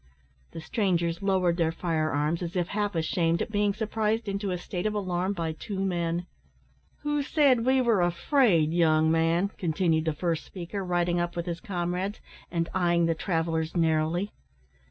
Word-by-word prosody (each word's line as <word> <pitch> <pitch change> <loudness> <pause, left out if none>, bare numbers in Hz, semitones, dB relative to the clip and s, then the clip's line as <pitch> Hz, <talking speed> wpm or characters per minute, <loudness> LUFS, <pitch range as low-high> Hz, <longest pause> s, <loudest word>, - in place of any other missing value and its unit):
The 165 - -6
strangers 170 -4 0
lowered 185 -3 +2
their 165 -2 +2
fire 165 -2 -1
arms, 150 +4 0
as 175 0 -4
if 175 -1 0
half 205 -2 -1
ashamed 165 +1 +1
at - - -3
being 205 -1 +2
surprised 220 +1 -1
into 200 0 -2
a 180 - -1
state 180 +2 -3
of 215 - -2
alarm 185 -1 -1
by 165 -4 -2
two 190 +5 -6
men. 175 -2 -1 0.8
"Who 295 0 0
said 275 -5 +3
we 260 0 +4
were 235 -4 +3
`afraid,' 175 - +3
young 160 -2 +3
man?" 165 +4 +2
continued 165 -2 +1
the 160 - +1
first 165 +1 -1
speaker, 190 +2 -6
riding 175 -1 +1
up 175 0 -2
with 170 -1 -3
his 170 -1 -4
comrades, 180 +2 -3 0.3
and 165 -1 -1
eyeing 175 -2 +2
the 165 - +2
travellers 165 -1 -1
narrowly. 165 +4 +1
175 Hz, 170 wpm, -27 LUFS, 165-200 Hz, 0.8 s, we